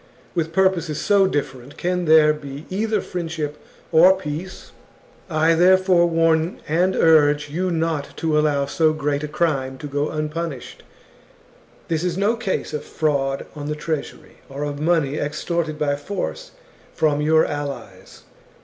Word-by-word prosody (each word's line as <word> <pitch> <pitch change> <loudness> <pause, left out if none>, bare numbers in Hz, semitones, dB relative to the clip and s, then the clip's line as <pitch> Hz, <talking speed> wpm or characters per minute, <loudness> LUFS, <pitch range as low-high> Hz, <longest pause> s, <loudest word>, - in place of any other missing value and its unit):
With 165 -2 -1
purposes 175 -4 +1
so 200 -2 +3
different, 135 -4 -4
can 180 0 -1
there 155 -1 +6
be 145 0 -9
either, 215 +1 0
friendship 160 -4 -5 0.3
or 175 +3 +7
peace? 170 +3 -7 0.6
"I, 160 0 +3
therefore, 180 0 +4
warn 165 0 +1
and 180 +4 +1
urge 150 -2 +4
you 185 +4 -1
not 165 -4 -2
to 160 -2 0
allow 150 -2 +2
so 155 +2 +2
great 145 -2 -1
a - - -2
crime 140 -4 -1
to 150 - -9
go 145 +1 -2
unpunished. 155 -2 -5 1.1
This 165 0 -1
is 180 -1 -1
no 205 +4 +2
case 225 -5 -3
of 150 - -3
fraud 140 -3 -1
on 145 -1 -6
the 150 - -2
treasury, 150 -1 -5
or 140 +2 -5
of 145 -1 -4
money 155 -3 +1
extorted 155 +1 -2
by 145 -2 0
force 205 - -5 0.5
from 150 -2 +1
your 160 +1 +4
allies. 135 -10 -7
155 Hz, 145 wpm, -21 LUFS, 145-170 Hz, 1.1 s, or